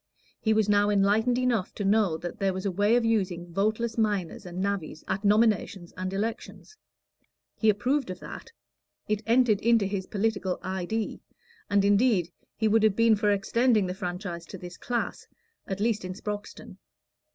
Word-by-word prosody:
He 220 - 0
was 220 -1 +3
now 205 0 +3
enlightened 210 +4 +2
enough 245 -7 0
to 205 - -3
know 200 -5 +3
that 175 +1 -7
there 195 -1 +1
was 190 +2 -5
a 200 - +1
way 205 +5 +2
of 240 -1 +2
using 180 -6 -1
voteless 220 +4 0
miners 200 -4 -1
and 175 +1 -6
navvies 190 -5 -3
at 195 - -2
nominations 205 -4 +2
and 185 0 -4
elections. 225 - -5 0.8
He 220 - +2
approved 250 +5 +1
of 185 -1 -6
that; - - -9 0.6
it 215 0 0
entered 230 -3 +3
into 230 -2 +3
his 195 -1 -3
political 200 -3 -1
"idee"; 190 +4 -3 0.5
and 200 -1 +3
indeed 205 -4 +3 0.2
he 220 - +1
would 220 +1 +4
have 215 -2 +3
been 230 0 +5
for 210 0 +1
extending 215 +2 +2
the 180 - -3
franchise 180 -2 -5
to 190 - -8
this 180 0 -9
class 240 -1 -3 0.4
at 195 -3 -4
least 215 -1 0
in 185 0 -5
Sproxton. 205 +1 -7
205 Hz, 170 wpm, -27 LUFS, 190-220 Hz, 0.8 s, been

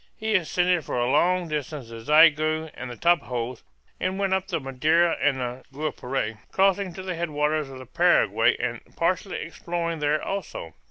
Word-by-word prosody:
He 220 0 -1
ascended 180 -2 +2
for - - -4
long 175 +7 +2
distances 135 -7 -5
the - - -1
Xingu 155 0 +5
and 125 +1 -7
the 120 - -7
Tapajos, 125 -8 0 0.4
and 185 +1 -1
went 195 -1 0
up 190 0 0
the 175 -4 -1
Madeira 155 +6 +2
and 130 -3 -1
Guapore, 135 -6 -3
crossing 195 0 +2
to 190 - -7
the 185 -1 -3
head 170 0 -3
waters 150 0 0
of 135 - -9
the 130 - -10
Paraguay - - +3
and - - -3
partially 180 +3 0
exploring 170 0 -4
there 150 +1 +1
also. 195 - -5
155 Hz, 165 wpm, -25 LUFS, 135-180 Hz, 0.4 s, Xingu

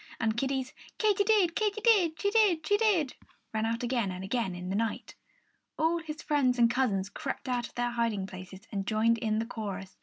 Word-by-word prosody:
And 220 -1 +1
Kiddie's 265 +1 -2 0.2
Katy 415 -2 +3
did, 395 -6 +3
Katy 430 -1 0
did; 390 -9 +3
she 405 - +1
did, 410 -7 +3
she 410 - +3
did 390 - +2 0.4
rang 220 0 0
out 230 +2 -2
again 240 -4 0
and 185 0 -5
again 195 -2 -1
in 180 +1 -6
the 190 - -1
night. 225 +1 -2 0.6
All 325 +2 +2
his 310 -2 -7
friends 270 -4 +2
and 235 -1 +4
cousins 210 -7 +1
crept 200 - -5
out 245 -2 -1
of - - -22
their 240 0 0
hiding 230 -5 -1
places 185 0 -10
and 195 -2 -3
joined 225 +1 +2
in 215 -2 0
the 225 - -1
chorus. 200 -5 -6
240 Hz, 205 wpm, -29 LUFS, 215-320 Hz, 0.6 s, and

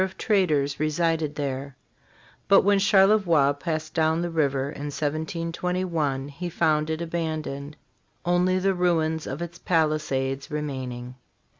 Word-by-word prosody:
of 190 0 -4
traders 150 -10 +1
resided 155 -1 0
there; 140 -2 -4 0.7
but 195 - +7
when 200 0 +4
Charlevoix 195 -7 +4
passed 155 +1 -4
down 160 +1 +1
the 175 - -3
river 140 -3 0
in 145 - -7
1721 160 -1 -2
he 175 +5 -5
found 155 -2 +1
it 160 +1 -2
abandoned, 155 -3 -4 0.5
only 180 +1 +2
the 195 +1 +2
ruins 160 -3 0
of 140 +6 -4
its 170 0 -8
palisades 150 -5 0
remaining. 130 -5 -4
155 Hz, 125 wpm, -25 LUFS, 145-175 Hz, 0.7 s, but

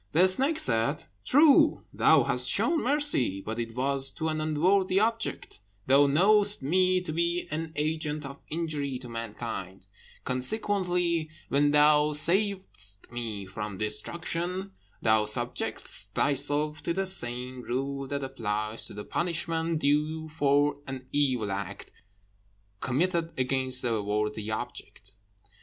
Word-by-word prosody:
The 180 +4 +5
snake 270 +12 +1
said, 115 +5 +1 0.2
"True, 290 +1 +5
thou - - +4
hast - - +1
shown 335 -2 +1
mercy, 270 - +2
but 110 +4 -5
it 115 -1 -5
was 135 +1 +3
to 160 -1 -3
an 155 0 -2
unworthy 185 +5 +2
object; 225 - -2 0.3
thou 140 +2 +5
knowest 200 +4 +3
me 185 +5 +2
to 160 -4 -5
be 170 +2 -1
an 160 +1 -4
agent 150 -1 -2
of 140 +1 -9
injury 150 -5 -2
to 125 - -9
mankind, 110 -5 -6 0.4
consequently, 175 - 0 0.2
when 145 +1 +3
thou 150 0 +4
savedst 170 - 0
me 115 -5 -5
from 100 +1 -6
destruction, 170 - -2 0.3
thou 110 -1 +3
subjectedst 105 0 -1
thyself 145 +2 +1
to 170 - -2
the 195 +2 -1
same 125 -7 -1
rule 135 +3 -3
that 140 0 -3
applies 110 -4 -2
to - - -7
the 105 - -7
punishment 165 -1 -2
due 155 +2 0
for 145 -1 +1
an 130 -1 -7
evil 130 -8 0
act 100 0 -6 0.9
committed 165 - -1
against 130 0 0
a 115 -3 0
worthy 105 +1 -2
object. 110 -3 -7
145 Hz, 130 wpm, -28 LUFS, 120-170 Hz, 0.9 s, The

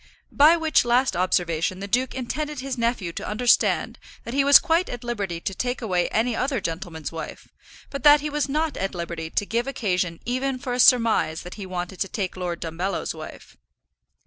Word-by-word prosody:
By 310 +4 +6
which 320 -2 +3
last 245 +2 +2
observation 175 0 0
the 200 - -5
duke 250 +5 0
intended 295 +3 -4
his 265 0 -4
nephew 230 -8 -1
to - - -6
understand 235 +3 +2 0.2
that 235 - -7
he 275 +1 +3
was 285 0 +9
quite 330 +3 +1
at 245 0 -6
liberty 200 -8 -3
to 195 - -3
take 245 +6 -2
away 185 -6 0
any 225 +2 0
other 260 0 -1
gentleman's 165 -3 -5
wife, 165 -1 -8 0.4
but 280 - -5
that 295 +2 +7
he 300 +1 -3
was 290 -2 -1
not 310 +1 -1
at 195 0 -3
liberty 170 -2 -5
to 205 - -1
give 235 +4 -1
occasion 180 -10 -1
even 255 +2 -1
for 250 -1 -4
a 250 - -2
surmise 230 - +4
that 180 - -9
he 200 -3 -8
wanted 180 0 -5
to 195 - 0
take 190 -2 -4
Lord 175 -2 -4
Dumbello's 175 +3 -3
wife. 155 -1 -11
230 Hz, 195 wpm, -24 LUFS, 180-260 Hz, 0.4 s, was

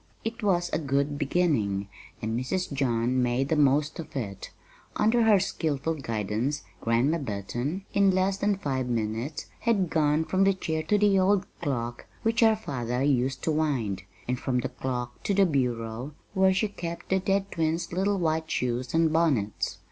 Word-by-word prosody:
It 225 +2 -4
was 175 -4 +1
a 155 - +2
good 140 0 0
beginning, 135 - +1 0.4
and 110 +1 -1
Mrs. 140 +8 -2
John 125 -2 +1
made 125 +3 +1
the 160 - +2
most 145 +1 +2
of 165 - -8
it. 100 -7 -4 0.5
Under 225 +2 +3
her 210 -3 +6
skillful 160 -5 -1
guidance 115 0 -2 0.2
Grandma 125 +8 +2
Burton, 125 - -3
in 200 -1 +4
less 190 +1 +2
than 205 0 +1
five 130 -7 -2
minutes, 115 +5 -2
had 200 -7 +1
gone 155 0 +2
from 190 +3 +2
the 195 0 +4
chair 160 -4 -2
to 205 +7 +2
the 205 -2 +4
old 195 +1 +3 0.2
clock 120 -4 -3 0.2
which 225 0 +1
her 225 -1 +6
father 125 - -3
used 130 -1 +1
to 160 - +1
wind, 130 -11 0 0.3
and 125 0 -1
from 130 -1 -1
the 130 - -3
clock 125 -2 -4
to 200 - 0
the 195 0 +5
bureau 125 -2 -2 0.2
where 190 -1 +4
she 195 +3 +1
kept 170 -4 -6
the 190 - +3
dead 195 +1 0
twins' 165 +1 -1
little 195 +3 +1
white 160 -2 0
shoes 125 +1 -1
and 165 -1 +3
bonnets. 140 - +1
150 Hz, 170 wpm, -27 LUFS, 125-185 Hz, 0.5 s, her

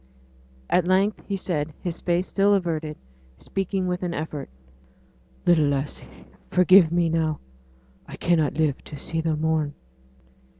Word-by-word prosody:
At 180 -1 +2
length 195 +3 +2
he 200 - -1
said, 160 -5 -2
his 175 -2 -4
face 175 +1 +1
still 200 +1 +3
averted, 160 -5 -2 0.4
speaking 195 - -2
with 180 0 -2
an 175 -2 -2
effort. 150 - -5 1.0
'Little 165 -4 +4
lassie, 140 0 -4 0.2
forgive 180 -2 +6
me 170 0 +2
now! 160 -2 0 0.7
I - - -8
cannot 160 -5 +1
live 155 -4 0
to 150 - -8
see 165 +3 -3
the 160 -1 0
morn!' 155 -1 0
165 Hz, 135 wpm, -24 LUFS, 155-180 Hz, 1.0 s, forgive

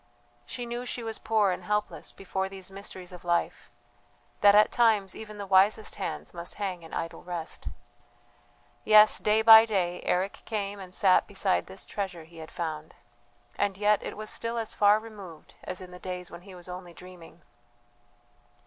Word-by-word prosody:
She 245 - -5
knew 240 +1 -4
she 245 -1 -5
was 225 -1 -5
poor 215 -3 +2
and 180 - -4
helpless 210 0 -2
before 190 0 -4
these 195 -1 -10
mysteries 190 -2 -9
of 180 -1 -11
life; 175 -1 -1 0.7
that 205 0 +6
at 210 +1 +6
times 215 -5 +2
even 215 -1 -9
the 200 - -5
wisest 195 +3 +3
hands - - -5
must 170 0 -7
hang 190 -4 -4
in 165 - -13
idle 165 - -5
rest. 175 -2 -6 1.2
Yes, 215 0 +7
day 215 +1 +2
by 220 0 +10
day 180 -4 -1
Eric 185 +2 -1
came 205 -2 -3
and 185 -1 -9
sat 190 -4 +4
beside 195 -1 0
this 190 0 -9
treasure 190 -5 -5
he 165 +1 -17
had 160 - -9
found, 155 -2 -5 0.6
and 200 -2 -1
yet 210 0 +3
it - - -6
was 215 0 -5
still 230 +1 -2
as 225 -2 -2
far 205 0 +5
removed 205 -8 -12
as 185 0 -6
in 180 -1 -10
the 180 - -11
days 180 -1 -6
when 170 - -10
he 190 0 -13
was 175 0 -12
only 180 -1 -8
dreaming. 175 -2 -14
195 Hz, 175 wpm, -28 LUFS, 180-210 Hz, 1.2 s, by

